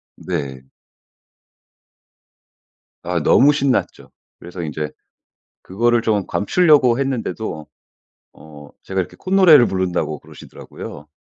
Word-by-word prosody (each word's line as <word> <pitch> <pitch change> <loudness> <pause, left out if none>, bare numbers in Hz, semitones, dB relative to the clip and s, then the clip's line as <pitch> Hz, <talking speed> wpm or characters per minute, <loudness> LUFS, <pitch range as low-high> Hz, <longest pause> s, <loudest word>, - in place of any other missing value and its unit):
네. 65 -2 -6 2.3
아 90 -1 -2
너무 140 - +5
신났죠. 140 -3 -1 0.3
그래서 90 +1 -9
인제 75 -1 -4 0.7
그거를 120 +4 0
좀 105 -4 0
감추려고 140 - +3
했는데도 115 - -4 0.7
어 75 -1 -14
제가 95 0 -3
이렇게 90 - -4
콧노래를 185 -9 +5
부른다고 90 -5 -2
그러시더라고요. 75 +1 -12
95 Hz, 240 characters per minute, -19 LUFS, 80-130 Hz, 2.3 s, 너무